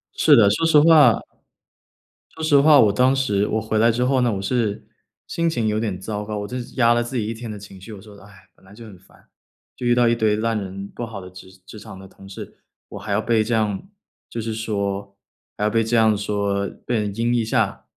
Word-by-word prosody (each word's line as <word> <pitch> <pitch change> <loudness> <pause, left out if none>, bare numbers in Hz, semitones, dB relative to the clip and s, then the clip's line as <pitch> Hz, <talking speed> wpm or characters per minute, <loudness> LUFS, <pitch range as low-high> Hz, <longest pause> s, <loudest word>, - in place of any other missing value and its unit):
是 - - +5
的， 105 -3 +5
说 165 +11 0
实 160 -2 +5
话 150 -7 +6 1.2
说 160 - -6
实 150 -2 +4
话， 150 0 +6
我 105 -3 +5
当 130 +5 +3
时 105 -7 0
我 110 - -1
回 110 0 -2
来 115 +2 +4
之 120 +2 -1
后 130 0 +1
呢， 120 -2 +1
我 95 - -4
是 110 -1 -2 0.4
心 170 0 -1
情 120 -8 -1
有 105 0 0
点 105 -5 -3
糟 105 +1 -5
糕， 105 0 -5
我 105 - -5
就 125 - -6 0.2
压 120 -2 +4
了 120 0 +1
自 120 +2 -5
己 110 - -1
一 115 - -3
天 115 0 -8
的 105 - -7
情 100 -1 -13
绪。 110 - -11
我 100 - -11
说： 105 0 -15
“哎， 100 -1 -18
本 - - -28
来 95 - -17
就 115 +1 -12
很 100 -4 -13
烦， 95 - -25 0.5
就 125 - -7
遇 120 - +3
到 120 -1 +3
一 115 - +2
堆 110 -2 +1
烂 115 +1 -1
人， 100 0 -7
不 120 - -7
好 110 -3 -8
的 90 -1 -11
职 95 0 -14
职 110 - -11
场 95 - -11
的 95 - -12
同 95 0 -16
事， 95 - -10 0.3
我 100 - -9
还 100 +1 -7
要 100 - +1
被 110 -1 +1
这 115 +2 -3
样 110 - -2 0.4
就 115 - -6
是 110 0 -4
说 100 -3 -4 0.4
还 - - -3
要 105 - +2
被 115 +1 +1
这 115 +1 0
样 110 -1 +4
说， 100 -1 -2 0.2
被 120 - -1
人 105 -2 -2
阴 115 +2 0
一 120 -1 +1
下， 110 - -1
110 Hz, 265 characters per minute, -21 LUFS, 100-120 Hz, 1.2 s, 话